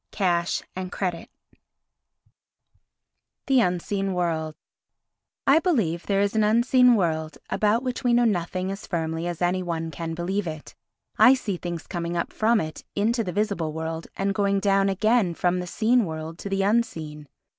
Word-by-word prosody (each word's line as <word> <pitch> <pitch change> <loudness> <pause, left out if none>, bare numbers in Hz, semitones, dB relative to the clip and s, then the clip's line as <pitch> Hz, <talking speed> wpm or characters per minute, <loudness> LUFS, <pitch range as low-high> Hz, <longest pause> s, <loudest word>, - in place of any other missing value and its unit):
XI - - -17
Cash 175 -3 +1
and 185 0 -5
Credit 180 -4 -3 2.2
The 270 -2 +4
Unseen 190 +1 -1
World 160 -3 -1 0.9
I 280 +4 +6
BELIEVE 215 - 0
there 200 -1 +2
is 205 +1 0
an 220 - +3
unseen 240 +3 +5
world 160 -5 -1
about 215 +3 +2
which 255 -1 -3
we 245 - +3
know 240 0 +4
nothing 185 -2 -1
as 195 +2 -7
firmly 165 -1 -2
as 175 0 -3
any 180 +1 +1
one 165 -2 -3
can 165 +2 -5
believe 185 +3 -2
it. 155 -1 -7 0.5
I 260 - +8
see 215 -7 -3
things 175 -2 -5
coming 170 -1 -3
up 170 - -3
from 225 +1 +3
it 155 -3 -5
into 230 +3 +1
the 180 - -4
visible 200 -6 -1
world 160 +1 -4
and 195 0 0
going 200 0 +1
down 195 0 +2
again 205 -2 +2
from 180 +1 +1
the 180 - -5
seen 230 +6 +2
world 160 0 -6
to 200 - -6
the 195 0 0
unseen. 160 -9 -1
185 Hz, 165 wpm, -25 LUFS, 170-215 Hz, 2.2 s, I